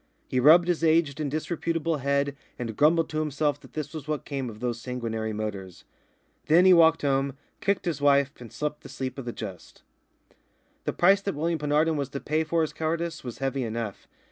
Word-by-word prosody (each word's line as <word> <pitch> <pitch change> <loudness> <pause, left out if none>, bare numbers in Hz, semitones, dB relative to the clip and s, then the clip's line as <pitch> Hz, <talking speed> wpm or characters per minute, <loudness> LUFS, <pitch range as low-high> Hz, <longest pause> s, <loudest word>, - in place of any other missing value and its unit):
He 130 - 0
rubbed 165 +6 +7
his 175 -2 0
aged 160 -3 +3
and 150 -2 -1
disreputable 165 +1 -1
head 140 +1 0 0.2
and 115 -3 -4
grumbled 160 +4 +4
to 155 - -2
himself 150 -1 0
that - - -17
this 155 0 -5
was 155 -2 -7
what 150 -1 -3
came 135 -3 -3
of 105 -1 -10
those 120 -1 -3
sanguinary 115 -3 -3
motors. 100 -4 -5 0.6
Then 170 +4 +6
he 185 - +8
walked 165 -2 +5
home, 135 -1 0 0.2
kicked 200 -1 0
his 160 -5 -2
wife, 140 -1 +4
and 120 -3 -10
slept 150 0 -4
the - - -11
sleep 130 0 -5
of 130 - -6
the 120 - -3
just. 95 -7 -9 1.0
The - - -1
price 195 +3 +4
that 195 -1 -3
William 165 +2 -1
Penarden 150 +2 +2
was 140 -2 -2
to 140 - -5
pay 155 +3 0
for 165 +1 0
his 155 - -3
cowardice 165 +1 -2
was 120 -3 -6
heavy 135 0 -1
enough. 115 -3 -5
145 Hz, 200 wpm, -27 LUFS, 125-160 Hz, 1.0 s, he